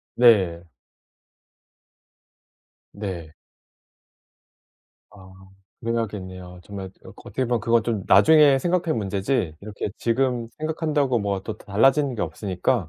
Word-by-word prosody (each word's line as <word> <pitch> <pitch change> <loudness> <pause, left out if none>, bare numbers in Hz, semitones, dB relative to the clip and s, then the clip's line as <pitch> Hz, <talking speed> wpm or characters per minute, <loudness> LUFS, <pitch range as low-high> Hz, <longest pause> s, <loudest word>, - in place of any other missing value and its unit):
네. 100 -9 +4 2.3
네. 90 -6 -6 1.8
아 95 -2 -15 0.5
그래야겠네요. 95 -6 -4
정말 95 -1 -8
그 - - -13 0.2
어떻게 130 - -2
보면 120 -2 0
그건 115 0 +2
좀 110 -5 -2
나중에 145 +7 +6
생각할 170 +2 0
문제지 100 - -1
이렇게 105 0 -5
지금 120 -1 0
생각한다고 155 -5 0
뭐가 100 -2 -2
또 110 0 -6
달라지는 135 +7 +2
게 110 - -2
없으니까. 90 +3 -2
110 Hz, 240 characters per minute, -23 LUFS, 95-130 Hz, 2.3 s, 나중에